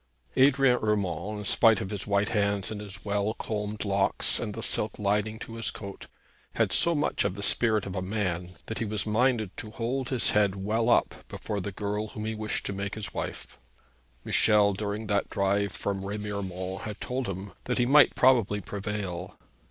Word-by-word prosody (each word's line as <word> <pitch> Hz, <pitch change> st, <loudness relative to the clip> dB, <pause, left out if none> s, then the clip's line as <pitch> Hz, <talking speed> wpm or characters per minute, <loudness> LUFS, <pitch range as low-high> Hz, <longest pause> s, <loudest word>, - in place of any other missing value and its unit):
Adrian 135 Hz, -2 st, +5 dB
Urmand, 105 Hz, -1 st, -1 dB
in 105 Hz, -, -6 dB
spite 115 Hz, +1 st, +5 dB
of 95 Hz, -, -4 dB
his 100 Hz, -2 st, -4 dB
white 100 Hz, 0 st, +2 dB
hands 100 Hz, -1 st, 0 dB
and 105 Hz, -1 st, -5 dB
his 100 Hz, -1 st, -8 dB
well 105 Hz, +1 st, 0 dB
combed 105 Hz, 0 st, -3 dB
locks 100 Hz, -1 st, +2 dB
and 105 Hz, -3 st, -4 dB
the 115 Hz, -, -4 dB
silk 105 Hz, -, 0 dB
lining 105 Hz, +2 st, 0 dB
to 115 Hz, 0 st, -8 dB
his 115 Hz, -3 st, -1 dB
coat, 100 Hz, -1 st, -8 dB, 0.5 s
had -, -, +1 dB
so 170 Hz, 0 st, +2 dB
much 150 Hz, -, 0 dB
of 90 Hz, -, -1 dB
the 100 Hz, -, -5 dB
spirit 110 Hz, -1 st, +3 dB
of 95 Hz, -, -5 dB
a 95 Hz, -, -1 dB
man 90 Hz, -3 st, -2 dB, 0.2 s
that 115 Hz, -, -4 dB
he 115 Hz, -, -1 dB
was 105 Hz, 0 st, -2 dB
minded 110 Hz, -2 st, +1 dB
to 110 Hz, -, -6 dB
hold 125 Hz, +4 st, -2 dB
his 130 Hz, -3 st, +2 dB
head 100 Hz, -2 st, +3 dB
well 110 Hz, +4 st, 0 dB
up -, -, +3 dB
before 105 Hz, -2 st, -4 dB
the 100 Hz, -, -4 dB
girl 105 Hz, +2 st, -3 dB
whom 105 Hz, 0 st, -6 dB
he 110 Hz, -, -2 dB
wished 110 Hz, -1 st, -2 dB
to -, -, -2 dB
make 100 Hz, +1 st, -4 dB
his 105 Hz, -3 st, -5 dB
wife. -, -, -6 dB, 0.7 s
Michel 105 Hz, -2 st, +4 dB
during 105 Hz, +2 st, -3 dB
that 100 Hz, -1 st, 0 dB
drive 100 Hz, 0 st, +1 dB
from 100 Hz, -1 st, -3 dB
Remiremont 100 Hz, -2 st, -4 dB
had 105 Hz, -1 st, -6 dB
told 125 Hz, 0 st, -3 dB
him 95 Hz, +1 st, -5 dB
that 125 Hz, -, -1 dB
he 120 Hz, -, +3 dB
might 145 Hz, +4 st, +6 dB
probably 115 Hz, -6 st, +4 dB
prevail. 100 Hz, -2 st, -5 dB
105 Hz, 190 wpm, -28 LUFS, 100-110 Hz, 0.7 s, might